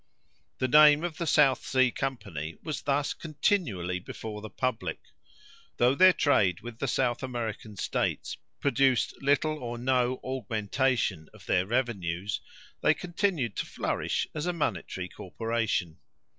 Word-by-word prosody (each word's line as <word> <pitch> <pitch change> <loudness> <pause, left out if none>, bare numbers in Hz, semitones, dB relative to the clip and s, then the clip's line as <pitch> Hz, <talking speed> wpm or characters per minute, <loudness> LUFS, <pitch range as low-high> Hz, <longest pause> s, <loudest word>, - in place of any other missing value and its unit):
The 130 - 0
name 150 +3 +7
of 175 -2 -3
the 170 - -2
South 145 -4 +4
Sea 130 -1 +3
Company 100 - -4
was 155 -2 -4
thus 145 +1 0
continually 135 - -1
before 105 +3 -7
the 110 - -7
public. 130 +3 -2 0.8
Though 125 +2 +4
their 185 +6 +7
trade 100 - +2
with 120 -1 -9
the 140 - -1
South 120 0 0
American 115 -4 -4
States - - -1 0.2
produced 135 -5 +2
little 145 +2 +2
or 120 -2 -5
no 125 0 +1
augmentation 120 - -1
of - - -15
their 90 +1 +1
revenues, 100 -6 -1 0.4
they - - +4
continued 175 - -1
to - - -2
flourish - - -1
as 155 +2 -3
a 180 - 0
monetary 95 - -2
corporation. 110 -3 -2
125 Hz, 135 wpm, -28 LUFS, 105-145 Hz, 0.8 s, name